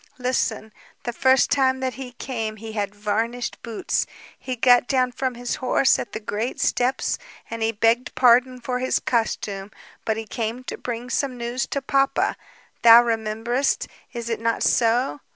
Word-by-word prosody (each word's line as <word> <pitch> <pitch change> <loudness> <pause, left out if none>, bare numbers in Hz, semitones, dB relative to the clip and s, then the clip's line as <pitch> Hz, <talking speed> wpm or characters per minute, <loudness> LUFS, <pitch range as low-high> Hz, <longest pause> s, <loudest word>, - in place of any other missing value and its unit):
Listen. 245 -4 -1 0.3
The 240 - -3
first 260 +1 +3
time 265 -2 +3
that 260 -1 -1
he 260 -2 -8
came 225 -4 -4
he 220 +1 -8
had 205 -2 -3
varnished 225 +4 -2
boots. 230 -3 -2 0.3
He 255 - -4
got 245 0 +5
down 255 -2 +2
from 255 0 -2
his 245 0 -3
horse 260 +1 +3
at - - -5
the 220 - -4
great 215 +3 -3
steps, 255 +2 0 0.3
and 230 0 -5
he 225 0 +2
begged 230 +3 +1
pardon 250 +1 +4
for 250 0 -2
his 255 +1 +1
costume, 205 -4 -2 0.3
but 220 -1 -1
he 225 - -4
came 230 +3 -4
to - - -6
bring 245 0 -5
some 265 -3 -1
news 240 +2 -2
to 280 - -3
papa. 275 0 +1 0.5
Thou 235 +1 +9
rememberest, 230 +3 -1 0.2
is 235 -2 -6
it 230 - -2
not 230 0 0
so? 230 - +2
240 Hz, 170 wpm, -23 LUFS, 225-255 Hz, 0.5 s, Thou